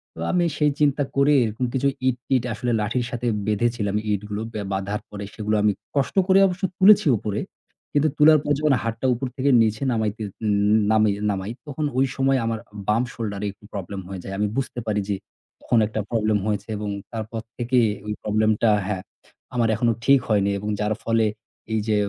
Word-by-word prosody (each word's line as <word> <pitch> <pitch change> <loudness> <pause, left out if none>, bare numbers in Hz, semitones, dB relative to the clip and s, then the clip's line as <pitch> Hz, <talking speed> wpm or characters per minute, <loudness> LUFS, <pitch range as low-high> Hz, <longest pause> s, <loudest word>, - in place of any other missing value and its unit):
তো - - -11
আমি 175 -1 +3
সেই 150 -1 +3
চিন্তা 145 -1 +3
করে 140 +2 +4
এরকম 110 +3 -2
কিছু 135 +1 +1 0.2
ইট-টিট 125 0 0
আসলে 120 +2 -2
লাঠির 120 +3 -1
সাথে 120 0 -3 0.2
বেঁধেছিলাম। 105 -1 0 0.2
ইটগুলোকে 105 +2 -3
বাঁধার 100 +2 -2
পরে 100 -1 -7
সেগুলো 110 0 -1
আমি 105 - +4 0.2
কষ্ট 140 +5 0
করে 190 +1 +6
অবশ্য 185 +1 -5
তুলেছি 205 -1 +6
উপরে। 105 0 -3 0.5
কিন্তু 150 +1 +3
তোলার 155 0 +7
পর 145 - -2
যখন 150 -2 +3
হাতটা 115 +3 -3
উপর 125 +2 -3
থেকে 140 +2 +1
নিচে 110 +1 +1
নামাইতে 110 -1 -1 0.7
ন - - +4 0.4
নামাই 95 +2 -3 0.2
তখন 150 +2 -3
ওই 135 - +4
সময় 135 0 +2
আমার 115 -1 -1 0.3
বাম 110 +3 +3
shoulder 105 -4 -4
এ - - 0
একটু 105 +1 -20
problem 100 -1 -5
হয়ে 95 -1 -6
যায়। 95 - -6
আমি 105 - +2
বুঝতে 130 -2 -2
পারি 105 -1 +1
যে 100 - +1 0.5
তখন 120 - +1
একটা 110 0 -4
problem 110 -2 +1
হয়েছে 105 -1 -2
এবং 105 0 -4 0.2
তারপর 110 0 -5 0.2
থেকেই 120 -1 +2 0.2
ওই 105 - -2
problem 110 +1 +2
টা 110 - +6 0.2
হ্যাঁ, 95 -3 -2 0.5
আমার 115 -2 +2
এখনো 115 +1 +2
ঠিক 140 0 +6
হয়নি 100 -2 +2
এবং 105 - -4
যার 105 +1 +1
ফলে 115 -1 +2 0.5
এইযে 110 0 +1
115 Hz, 180 wpm, -23 LUFS, 105-130 Hz, 0.7 s, তোলার